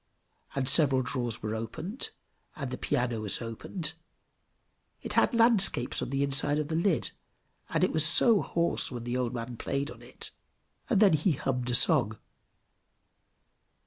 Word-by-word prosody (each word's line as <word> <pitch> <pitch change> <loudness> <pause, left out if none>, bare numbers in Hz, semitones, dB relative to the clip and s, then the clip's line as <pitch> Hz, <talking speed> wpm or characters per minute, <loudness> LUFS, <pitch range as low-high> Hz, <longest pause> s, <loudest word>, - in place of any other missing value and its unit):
And 135 -2 -1
several 135 -2 +4
drawers 120 -4 -3
were 110 0 -2
opened, 155 - -5 0.5
and 135 -4 -5
the 130 - -4
piano 120 -3 -1
was 105 -2 +1
opened; 140 - -5 1.1
it - - -4
had - - +3
landscapes 230 - +3
on - - -3
the 135 +1 0
inside 140 +1 +2
of 150 0 -2
the 160 - -1
lid, 170 -1 +1 0.6
and - - 0
it - - +2
was 155 -1 +4
so 200 +7 +5
hoarse 170 0 0
when 120 -3 -6
the 120 +1 -3
old 125 -1 -1
man 120 0 -6
played 140 +4 -3
on - - -13
it! - - -5 0.6
and 210 - +3
then 200 -5 +6
he 155 +3 +2
hummed 125 -2 -2
a 125 - +2
song. 125 - +3
135 Hz, 160 wpm, -29 LUFS, 120-160 Hz, 1.1 s, then